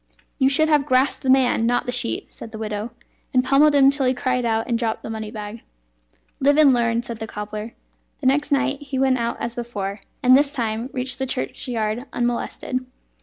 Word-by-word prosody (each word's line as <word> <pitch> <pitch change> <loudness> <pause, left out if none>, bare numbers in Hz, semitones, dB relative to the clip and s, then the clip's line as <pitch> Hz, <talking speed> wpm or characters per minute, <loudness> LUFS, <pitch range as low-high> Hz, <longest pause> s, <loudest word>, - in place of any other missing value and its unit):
"You 265 -1 +4
should 310 +3 +3
have 300 -2 +2
grasped 260 0 +2
the 265 - -2
man, 255 -3 +3
not 245 +1 +1
the 245 - -2
sheet," 240 - -2
said 225 - -10
the 220 - -7
widow, 215 0 -4 0.5
"and 255 - +5
pummelled 290 +3 +4
him 275 -1 +6
till 280 -2 +1
he 255 - +2
cried 250 0 -1
out 225 0 0
and 235 -2 0
dropped 225 -2 -2
the - - -5
money 220 -1 -5
bag." 215 +1 -7 0.8
"Live 285 +2 +3
and 295 -4 +6
learn," 235 -1 +1
said 235 -2 -6
the 220 - -5
cobbler. 210 +1 -6 0.4
The 285 - -8
next 290 +3 +2
night 280 0 +1
he 275 -2 -5
went 260 -1 +2
out 235 0 -2
as 235 - -3
before, 205 -4 -5 0.2
and 255 0 +7
this 285 +1 +3
time 230 -1 -2
reached 255 0 -1
the 265 - -1
churchyard 220 - -2
unmolested. 245 +1 -2
245 Hz, 205 wpm, -22 LUFS, 225-270 Hz, 0.8 s, and